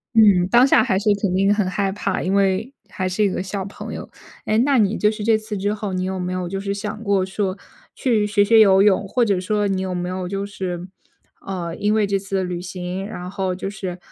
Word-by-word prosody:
嗯， 200 -5 +6
当 240 +2 +6
下 - - +5
还 195 -6 +1
是 210 +1 0
肯 195 -3 0
定 195 +2 +3
很 205 -3 0
害 195 +1 -1
怕， 195 -1 -2
因 190 +2 0
为 200 +5 +1 0.2
还 185 -2 -3
是 210 +3 0
一 200 - +3
个 180 - -3
小 190 0 -4
朋 200 - -8
友。 - - -7 0.4
哎， 215 +1 +2
那 275 +2 +3
你 215 -2 +2
就 210 - +2
是 215 -1 -5
这 225 0 +4
次 215 -1 -5
之 205 +2 -1
后， 210 -2 -4
你 185 - -1
有 185 0 -3
没 180 0 -3
有 185 -1 -3
就 195 +2 -4
是 200 0 -3
想 210 +2 -5
过 200 -3 +1
说， 190 0 -2 0.4
去 220 -5 +1
学 205 -1 +3
学 225 +1 +5
游 195 -2 +6
泳？ 200 -1 +3
或 240 +4 +1
者 200 -4 +1
说 205 +2 0
你 190 -1 -1
有 185 -1 -3
没 175 0 -3
有 185 0 -4
就 195 +2 -3
是 185 -3 -5 0.5
呃， 175 -3 -5
因 210 +1 +1
为 215 -2 +3
这 200 0 0
次 195 -1 -2
旅 175 -1 -4
行， 180 0 -5
然 180 -4 -7
后 190 -2 -2
就 195 +2 -5
是， 185 -3 -5
195 Hz, 265 characters per minute, -21 LUFS, 185-210 Hz, 0.5 s, 嗯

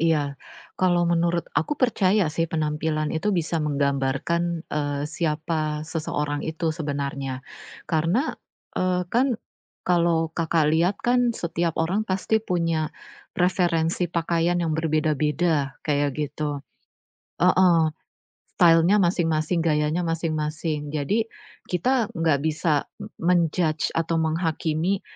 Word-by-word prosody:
Iya, 150 -4 +1 0.4
kalau 175 -2 +3
menurut 170 0 +1
aku 160 - 0
percaya 210 -5 +3
sih 165 -1 0
penampilan 155 -1 -1
itu 160 +6 -1
bisa 170 -4 0
menggambarkan, 145 +4 0
eee, 145 -1 -1
siapa 155 0 -2
seseorang 150 -2 -2
itu 160 0 -2
sebenarnya. 140 -4 -4 0.4
Karena, 170 - +1 0.4
eee, 180 0 0
kan 250 0 +2 0.5
kalau 170 -2 +2
Kakak 160 -2 +1
liat 175 +5 +2
kan 245 -1 +2
setiap 170 -1 -1
orang 190 +7 0
pasti 195 +4 +1
punya 165 -5 0 0.5
referensi 175 -1 +1
pakaian 170 +1 0
yang 160 - 0
berbeda-beda, 155 -1 +1
kayak 145 -2 0
gitu. 150 -1 -3 0.8
Heeh. 175 -3 +4 0.6
Style-nya 175 +4 +5
masing-masing, 170 -2 +1
gayanya 155 +2 +1
masing-masing. 155 -2 -2
Jadi 155 +10 0 0.4
kita 235 +7 +1
gak 160 -4 +2
bisa 155 -1 +1 0.3
men-judge 165 -2 +1
atau 165 0 +1
menghakimi, 160 +3 0
165 Hz, 105 wpm, -24 LUFS, 150-175 Hz, 0.8 s, Style-nya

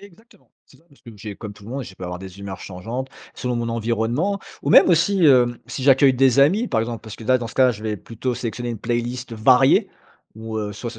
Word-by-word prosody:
Exactement, 205 +3 -19 0.2
c'est - - -21
ça, - - -27
parce 140 - -24
que 120 - -12
j'ai, 105 0 -8
comme 105 -3 -8
tout 105 - -18
le 110 - -10
monde, 135 +1 -4
je 95 - -12
peux 95 - -14
avoir 90 0 -5
des 95 +1 -11
humeurs 100 -1 -7
changeantes, 115 +8 -6 0.3
selon 125 -1 -3
mon 120 -1 -2
environnement. 115 - -1 0.2
Ou - - -1
même - - +7
aussi, 180 +2 +3
heu, 125 -4 +5
si 130 - -5
j'accueille 135 0 +5
des 130 0 +4
amis, 190 - +3
par 115 - 0
exemple, 115 0 -4
parce 110 -2 -10
que - - -12
là, 130 +2 +3
dans 120 - -5
ce - - -11
cas-là, 130 -1 +4
je 110 -3 -8
vais 105 -1 -2
plutôt 120 +5 -4
sélectionner 120 +1 -4
une 115 - -5
playlist 120 +2 -3
variée 125 +4 +4 0.5
ou, 110 0 -7
heu, 105 -1 -4
soit 115 +4 -6
ce 115 - -12
120 Hz, 250 wpm, -21 LUFS, 110-135 Hz, 0.5 s, même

